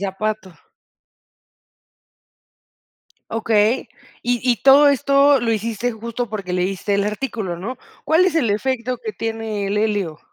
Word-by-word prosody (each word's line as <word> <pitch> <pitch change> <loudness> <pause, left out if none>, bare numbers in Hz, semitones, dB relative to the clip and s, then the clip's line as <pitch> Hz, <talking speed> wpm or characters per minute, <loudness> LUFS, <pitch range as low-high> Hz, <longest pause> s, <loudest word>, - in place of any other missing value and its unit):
zapato. 200 0 -3 2.8
Okey. 225 +2 +1 0.3
Y 245 0 0
y 250 -2 +2
todo 275 +2 +7
esto 280 0 +4
lo 230 -1 0
hiciste 230 +2 -2
justo 230 +1 -5
porque 200 -4 -5
leíste 185 +2 -1
el 200 0 +1
artículo, 210 -4 -3
¿no? 220 +9 -6 0.3
¿Cuál 320 +3 +4
es 370 -3 +1
el 270 -10 +2
efecto 250 +3 -1
que 435 - -6
tiene 225 - -3
el 205 +1 0
helio? 205 -8 -1
225 Hz, 130 wpm, -20 LUFS, 205-255 Hz, 2.8 s, todo